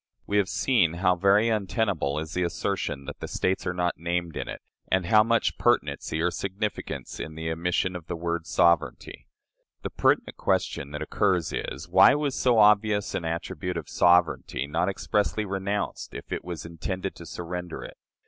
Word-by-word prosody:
We 105 - 0
have 100 -2 +2
seen 105 -12 +2
how 90 +1 +2
very 100 +5 +4
untenable 100 - 0
is 80 +1 -4
the 90 - -1
assertion 85 -5 -2
that - - -8
the - - -5
States 95 0 -1
are 90 - 0
not 90 -2 -1
named 85 0 -2
in - - -4
it, - - -7 0.2
and 95 -1 +1
how 105 +5 +6
much 115 0 +1
pertinency 70 +2 +1
or 85 +2 +1
significance 100 +3 -4
in 80 - -6
the 80 0 -3
omission 90 +2 0
of 85 -2 -7
the - - -3
word 85 -1 -3
"sovereignty." 85 +1 +1 0.6
The - - -4
pertinent - - +1
question 70 - 0
that 75 0 -4
occurs 95 -6 +1
is, 70 +5 -4
Why 95 +9 +7
was 145 -2 -1
so 125 -3 +2
obvious 105 -1 +4
an 85 - -2
attribute 85 +2 -3
of 80 - -5
sovereignty 85 -5 +2
not 85 +6 0
expressly 105 +2 0
renounced 100 +1 -3
if - - -9
it - - -3
was 85 -2 -6
intended 90 +3 -4
to 85 - -11
surrender 90 +1 -6
it? - - -10
90 Hz, 175 wpm, -26 LUFS, 85-100 Hz, 0.6 s, Why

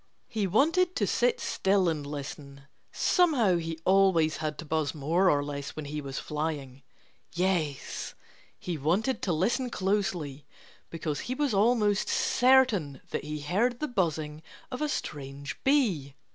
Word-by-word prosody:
He 215 -4 -1
wanted 330 - +2
to - - +1
sit - - +1
still 190 -1 +1
and 150 -4 -1
listen. 140 -1 -7 0.3
(Somehow 265 - +3
he 165 -1 -4
always 185 -5 +4
had 155 -1 -3
to 165 - -7
buzz 155 0 -1
more 165 +6 +2
or 145 -3 +2
less 140 -1 -5
when 155 - -5
he 150 +1 -4
was 135 -1 -6
flying.) 150 -4 -4 0.5
Yes! 170 -6 -1 0.4
he 170 -4 -4
wanted 190 - 0
to 185 - 0
listen 225 - 0
closely 185 - -1 0.5
because 160 -3 -3
he 255 - -1
was 285 -3 0
almost 210 -1 +2
certain 240 - +3
that - - -2
he 150 0 -5
heard 220 +11 0
the 305 - -1
buzzing 160 - -1 0.3
of 255 - -5
a 300 - 0
strange 140 - -5
bee. 200 - +2
170 Hz, 145 wpm, -28 LUFS, 150-220 Hz, 0.5 s, always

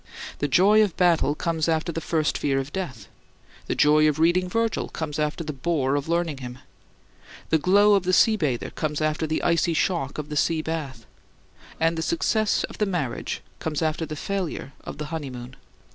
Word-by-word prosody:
The 145 - 0
joy 195 +10 +5
of 205 -6 0
battle 170 -5 +3
comes 165 -1 -1
after 160 +1 0
the 165 - -4
first 155 -2 0
fear 135 -2 0
of 135 +2 -3
death; 130 - -5 0.6
the - - -1
joy 155 +1 +5
of 150 - -2
reading 175 +3 +2
Virgil 230 +3 -1
comes 155 -2 -4
after 150 +2 -1
the 155 -1 -4
bore 140 -1 0
of 145 +2 -2
learning 170 -4 0
him; 125 -1 -7 0.9
the 160 - +4
glow 205 +5 +5
of 200 - +4
the 185 0 -1
sea 215 +4 +5
bather 145 - -2
comes 150 -2 -3
after 155 +1 0
the 155 - -2
icy 170 -1 +2
shock 155 -6 0
of 150 -1 -5
the 150 - -3
sea 160 +1 +1
bath; 145 -8 -5 0.7
and 165 0 +1
the - - -1
success 215 +6 +1
of - - -7
the 210 - +2
marriage 165 -11 -3 0.2
comes 160 0 -2
after 160 +1 -1
the 155 - -5
failure 180 -5 -4
of - - -7
the 150 - -4
honeymoon. 125 -5 -6
160 Hz, 190 wpm, -25 LUFS, 145-175 Hz, 0.9 s, joy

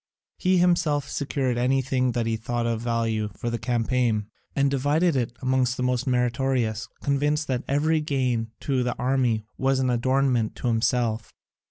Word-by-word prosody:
He 185 0 +3
himself 170 -5 +2
secured 135 -4 -1
anything 130 0 +1
that 120 -1 0
he 115 0 0
thought 120 +1 -2
of 115 -1 -1
value 115 -2 -1
for 120 - -3
the 120 - -2
campaign, 115 -2 0 0.2
and 140 0 +2
divided 145 +5 +2
it 120 -2 -2
among 130 0 +2
the 125 - -1
most 125 0 0
meritorious, 125 -2 0 0.2
convinced 145 +2 +1
that 125 -2 -1
every 155 +3 +2
gain 125 -6 -1
to 135 -3 0
the 125 -1 -2
army 125 -4 +1
was 135 0 +2
an 130 -1 +1
adornment 125 -1 +1
to 125 - -2
himself. 115 0 0
125 Hz, 160 wpm, -25 LUFS, 115-135 Hz, 0.2 s, He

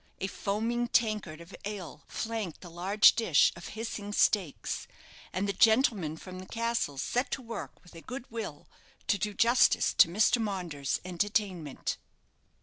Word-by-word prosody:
A - - -2
foaming 225 +5 -1
tankard 210 -9 0
of 170 +3 -11
ale 190 -7 -6
flanked 220 -7 -4
the 175 - -10
large 190 +5 +5
dish 180 -11 +4
of 170 - -9
hissing 210 -2 -4
steaks; 190 -8 +1 0.4
and 190 +2 -1
the 200 - 0
gentlemen 220 - +3
from 185 +2 -9
the 185 - -9
castle 230 -11 -1
set 245 - -1
to 270 - -3
work 230 -2 -7
with 180 - -17
a 165 - -10
good 255 +5 -7
will 215 -10 -6 0.4
to 205 - +1
do 210 +2 -2
justice 235 +3 +4
to - - +7
Mr. 215 +6 +3
Maunders's 175 -10 -2
entertainment. 185 -5 -2
200 Hz, 150 wpm, -30 LUFS, 175-225 Hz, 0.4 s, to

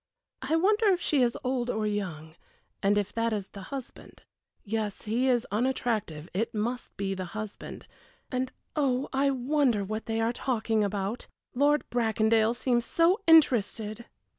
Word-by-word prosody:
I 275 +5 0
wonder 420 +6 +3
if 375 -3 +4
she 295 -6 +2
is 240 -1 +2
old 250 -1 -1
or 220 -2 -1
young 175 -7 -4 0.5
and 200 +1 +3
if 205 -1 -1
that 230 0 0
is 200 -2 -3
the 200 - -10
husband. 270 -3 -8 0.4
Yes, 215 -1 -3
he 235 +5 0
is 245 -2 +2
unattractive 215 - -1
it 220 +5 -2
must 235 +4 -3
be 195 -1 -1
the 185 -1 -4
husband 215 -1 -7 0.5
and 255 0 -1 0.2
oh, 270 -3 +1
I 275 +1 +3
wonder 260 -4 +1
what 215 +2 -5
they 225 0 -1
are 225 +1 +1
talking 225 -4 0
about! 200 +2 -3 0.3
Lord 290 +3 +2
Bracondale 225 -1 +2
seems 240 -1 +1
so 335 - +2
interested!" 235 -8 +4
230 Hz, 155 wpm, -28 LUFS, 210-260 Hz, 0.5 s, if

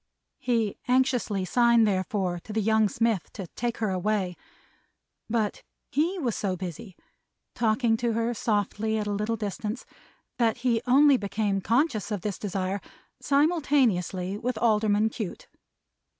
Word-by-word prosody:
He 235 -6 0
anxiously 250 -6 +1
signed, 235 +1 +4
therefore, 185 -2 -1
to - - -8
the 220 - +1
young 220 0 +3
smith, 225 -4 0
to 195 - -6
take 240 -1 -2
her 215 -3 -1
away. 185 -1 -1 0.9
But 220 -2 -1 0.3
he 330 +8 +1
was 255 -10 -1
so 190 -3 -1
busy, 180 +1 -7 0.6
talking 225 0 +2
to 235 0 0
her 230 +1 0
softly 220 0 -1
at 210 - -2
a 205 - -2
little 210 +3 -1
distance, 210 +3 -4 0.5
that 230 -2 +2
he 230 -3 +2
only 275 +2 +6
became 200 -2 -1
conscious 230 - +1
of 205 -4 -3
this 205 0 -3
desire, 195 -1 -2 0.4
simultaneously 260 - +1
with 245 0 -2
Alderman 215 -1 +2
Cute. 215 -4 -6
220 Hz, 135 wpm, -27 LUFS, 200-240 Hz, 0.9 s, only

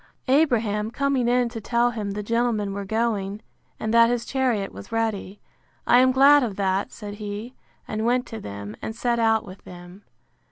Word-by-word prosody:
Abraham 230 -7 +2
coming 265 0 0
in 245 0 +2
to 230 -1 -7
tell 240 +2 +1
him 215 -3 -4
the 210 +1 -4
gentlemen 230 -2 0
were 200 0 -5
going, 210 -1 -2 0.4
and 220 +1 -2
that 230 0 +6
his 240 -1 -1
chariot 245 -7 0
was 195 - -11
ready; 220 -3 -2 0.5
I 245 - +6
am 255 0 +5
glad 280 +3 +6
of 225 -6 -2
that, 195 0 -1
said 205 -2 -8
he; 210 +3 -6 0.3
and 215 0 -3
went 245 +2 +1
to 225 - -7
them, 100 - -7
and 220 - -5
set 235 0 0
out 225 -1 +2
with 190 0 -12
them. 180 +2 -12
225 Hz, 185 wpm, -24 LUFS, 205-240 Hz, 0.5 s, that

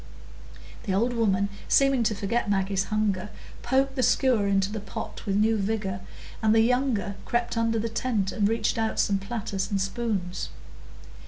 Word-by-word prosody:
The 190 - 0
old 235 +5 +1
woman, 200 -4 +1 0.2
seeming 275 -2 +4
to 215 0 +1
forget 205 +2 -1
Maggie's 195 0 +1
hunger, 210 -2 -1 0.3
poked 265 +2 +1
the 260 - 0
skewer 245 -5 +3
into 195 0 +1
the 215 - -3
pot 205 - -7
with 195 - +1
new 220 +2 +3
vigor, 195 -2 -2 0.4
and 220 0 +4
the 225 - +6
younger 240 -4 +1
crept 240 0 -1
under 230 0 +1
the 225 +1 -1
tent 225 -4 -1
and 205 +1 +1
reached 225 +1 0
out 225 -1 -1
some 200 -1 +2
platters 195 -2 -3
and 200 - 0
spoons. 195 -3 -2
215 Hz, 165 wpm, -26 LUFS, 195-235 Hz, 0.4 s, the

